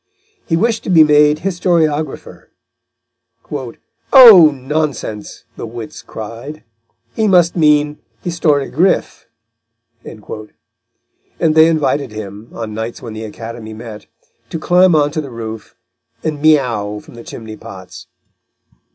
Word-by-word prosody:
He 165 - +1
wished 225 +4 0
to - - -4
be 165 -4 +7
made 150 0 +4
historiographer; 170 -5 -1 1.6
"Oh, 220 - +10
nonsense," 135 -6 -4
the - - -6
wits 115 -1 -9
cried, 115 +8 -9 0.5
"he 220 - +1
must 175 -3 +3
mean 150 -2 +2 0.3
historiogriffe" 165 +1 0 0.8
and 110 +8 -7
they 160 0 +6
invited 145 -5 0
him, 105 +1 -9
on 110 -2 -6
nights 110 +3 -6
when 115 -3 -7
the 110 +1 -6
Academy 110 0 -8
met, 110 -2 -10 0.4
to - - -4
climb 180 +2 +3
on 145 -1 +2
to 155 - -2
the 140 - -8
roof 110 -2 -8 0.5
and 155 -2 -3
miau 120 -9 +1
from - - -16
the 120 -1 -11
chimneypots. 110 -4 -10
145 Hz, 115 wpm, -16 LUFS, 110-160 Hz, 1.6 s, Oh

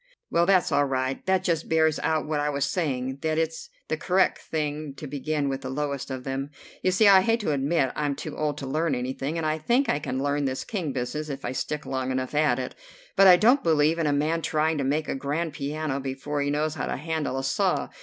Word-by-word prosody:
"Well, 170 +1 +3
that's 190 -2 +4
all 145 - +3
right. 130 0 -2
That 190 -1 +2
just 165 -4 -1
bears 160 -1 +3
out 160 -1 0
what 150 -1 -1
I 145 0 0
was 140 -1 0
saying, 130 -6 -2
that 155 -1 0
it's 160 0 -2 0.2
the 155 - -1
correct 185 +4 +2
thing 150 -2 -3
to 150 - -8
begin 145 +1 -2
with 135 0 -2
the 130 - -5
lowest 140 0 -3
of 130 -1 -5
them. 135 +1 -3 0.3
You - - +2
see 185 +4 +4
I 195 -1 +8
hate 230 +4 +2
to 180 - 0
admit 140 -1 +1
I'm 145 -2 -1
too - - -6
old 150 -1 -1
to 140 - -5
learn 155 +2 0
anything, 130 +5 -3
and 165 - -2
I 155 0 0
think 240 - +2
I 145 - +2
can 135 -2 -3
learn 145 0 0
this 130 -1 -2
King 180 -9 -3
business 135 +4 -3
if 135 -1 -5
I - - -2
stick 150 +3 -3
long 130 -1 -2
enough 130 +1 -2
at 150 -4 +3
it. 130 -1 -4 0.4
But 195 0 +7
I 180 - +10
don't 245 +8 +5
believe 160 0 +3
in 160 - +1
a - - +2
man 155 +3 +1
trying 155 0 0
to - - 0
make 150 +3 0
a - - -1
grand 145 +4 -2
piano 145 -1 -3
before 135 +2 -3
he 140 - 0
knows 150 +1 0
how - - -3
to - - -2
handle 155 -2 -2
a 135 - -2
saw. 135 - 0
150 Hz, 245 wpm, -26 LUFS, 135-160 Hz, 0.4 s, I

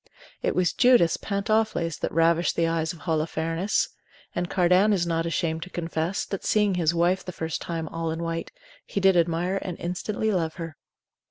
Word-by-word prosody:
It - - 0
was 180 -2 +2
Judith's 245 -10 +5
pantofles 200 -5 0
that - - -2
ravished 165 +1 +2
the 165 - +2
eyes 165 -1 0
of 170 - -12
Holofernes. 165 +3 0 0.5
And 175 +1 -2
Cardan 185 +3 +4
is 180 -3 +1
not 165 -1 0
ashamed 165 -1 -1
to 180 - -7
confess, 165 +1 -2
that 195 - -5
seeing 210 -2 +2
his 170 -3 +2
wife 175 +3 +2
the 180 - -6
first 160 -2 -4
time 165 -2 -4
all 165 0 -3
in 165 +1 -3
white, 165 0 -3 0.3
he - - -3
did 190 -1 +5
admire 175 +3 +1
and 180 -2 -5
instantly 205 +5 -2
love 165 -5 -1
her. 165 -4 -6
170 Hz, 180 wpm, -26 LUFS, 165-190 Hz, 0.5 s, Judith's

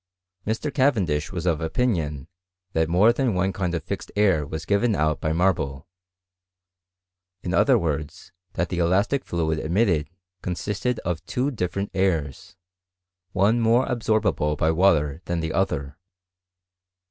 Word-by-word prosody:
Mr. 115 +7 -2
Cavendish 100 - +1
was 90 -3 -4
of 85 -2 +1
opinion 80 - -1 0.5
that 80 0 +1
more 100 +7 +5
than 125 -5 0
one 95 +1 0
kind 90 -3 -2
of 85 - -3
fixed - - -5
air 95 -8 +2
was 80 +1 -5
given 105 +3 +2
out 80 -1 0
by 80 - 0
marble; 80 -6 0 1.6
in 90 - -3
other 130 +5 +4
words, 75 -6 -4 0.2
that 85 - -1
the 90 - -2
elastic 100 +11 +2
fluid 80 -2 -1
emitted, 85 -2 +1 0.3
consisted 105 +7 -2
of 85 -2 -3
two 130 +3 -1
different 100 -3 -3
airs, 85 -9 -1 0.8
one 105 +6 +2
more 115 +3 +3
absorbable 110 - 0
by 80 +2 +2
water 80 -4 +2
than 85 -1 -2
the 80 -1 -3
other. 75 -5 -1
90 Hz, 135 wpm, -24 LUFS, 80-105 Hz, 1.6 s, more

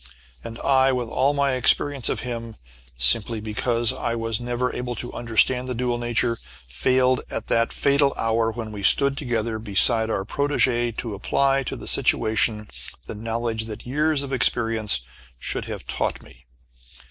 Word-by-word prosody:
And 115 0 -8
I, 135 -1 +3
with 125 -3 -2
all 135 +4 +1
my 140 -1 +1
experience 135 +1 +2
of - - -2
him, 115 -2 -6 0.4
simply 105 - +3
because 115 +2 -1
I 115 - -3
was 115 -1 -2
never 120 +1 -2
able 125 0 -4
to 120 +2 -6
understand 125 +2 +2
the 125 - -3
dual 120 0 -1
nature, 120 -1 -1 0.3
failed 130 - +1
at - - -5
that 115 0 +2
fatal 140 0 +2
hour 115 0 0
when 110 -1 -6
we 105 -1 -7
stood 140 +7 +5
together 115 -5 -2
beside 110 +2 +3
our 95 -3 -2
protégée 120 -3 0
to 115 -3 -4
apply 135 +7 +1
to - - -4
the - - -9
situation 110 -1 +2 0.4
the - - -7
knowledge 115 +1 -3
that 110 0 -8
years 150 +3 0
of 135 -1 -6
experience 115 - +2 0.4
should - - -3
have - - -7
taught - - -3
me. - - -19
120 Hz, 160 wpm, -23 LUFS, 110-130 Hz, 0.4 s, stood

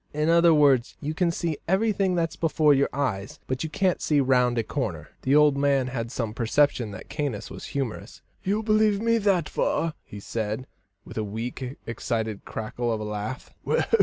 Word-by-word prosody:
"In 150 +1 +1
other 170 0 +6
words, 140 -5 +4
you 155 +1 -3
can 175 +2 +1
see 165 -2 -2
everything 195 0 +2
that's 165 -2 0
before 155 -2 +3
your 140 0 +2
eyes, 115 -9 -2
but 130 +2 -2
you 160 - -3
can't 185 +3 +1
see 150 -2 +2
round 125 -2 +3
a 115 - +2
corner." - - -3
The 135 +2 +2
old 150 -1 +6
man 140 -2 +2
had 115 -3 -4
some 115 -4 -3
perception 120 0 +2
that 100 -2 -9
Caius 135 -9 -3
was - - -8
humorous. 130 -6 -4 0.2
"You 205 +3 0
believe 215 -1 +3
me 230 +1 +2
that 195 -6 +2
far," 165 -1 0
he 105 - -10
said, 110 +3 -3 0.4
with - - -6
a - - 0
weak, 120 +5 -5
excited 110 -2 -3
cackle 115 +2 -3
of 110 - -1
a - - -4
laugh. 105 +4 -5
140 Hz, 185 wpm, -26 LUFS, 115-165 Hz, 0.4 s, other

